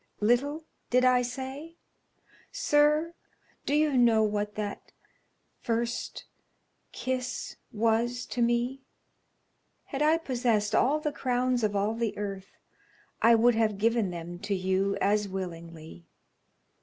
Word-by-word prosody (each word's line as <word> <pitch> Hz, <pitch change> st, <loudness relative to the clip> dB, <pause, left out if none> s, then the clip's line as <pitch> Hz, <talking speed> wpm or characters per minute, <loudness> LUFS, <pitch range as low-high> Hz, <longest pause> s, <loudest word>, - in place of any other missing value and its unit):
'Little,' 275 Hz, +8 st, +1 dB, 0.3 s
did 250 Hz, +1 st, +3 dB
I 250 Hz, -1 st, +5 dB
say? 265 Hz, +6 st, -6 dB, 0.8 s
Sir, 305 Hz, -8 st, +2 dB, 0.5 s
do 290 Hz, -, +2 dB
you 300 Hz, -2 st, +2 dB
know 230 Hz, -3 st, +4 dB
what 210 Hz, 0 st, -1 dB
that 210 Hz, -1 st, -5 dB, 0.7 s
first 235 Hz, 0 st, -3 dB, 0.7 s
kiss 255 Hz, -1 st, -4 dB
was 230 Hz, +3 st, 0 dB
to 245 Hz, -, -4 dB
me? 240 Hz, +3 st, +1 dB, 1.0 s
Had 275 Hz, -, -5 dB
I 310 Hz, +2 st, +4 dB
possessed 240 Hz, -8 st, 0 dB
all 290 Hz, +5 st, +3 dB
the 300 Hz, -1 st, -2 dB
crowns 250 Hz, -2 st, 0 dB
of 205 Hz, -1 st, 0 dB
all 205 Hz, +2 st, +1 dB
the 230 Hz, -1 st, -2 dB
earth 195 Hz, -2 st, -6 dB, 0.6 s
I 230 Hz, 0 st, +6 dB
would 240 Hz, +2 st, +4 dB
have 220 Hz, -2 st, +1 dB
given 225 Hz, -1 st, +1 dB
them 175 Hz, 0 st, -7 dB
to 200 Hz, +1 st, -2 dB
you 190 Hz, +1 st, 0 dB
as 210 Hz, +1 st, +1 dB
willingly. 165 Hz, -, -8 dB
235 Hz, 120 wpm, -28 LUFS, 205-255 Hz, 1.0 s, I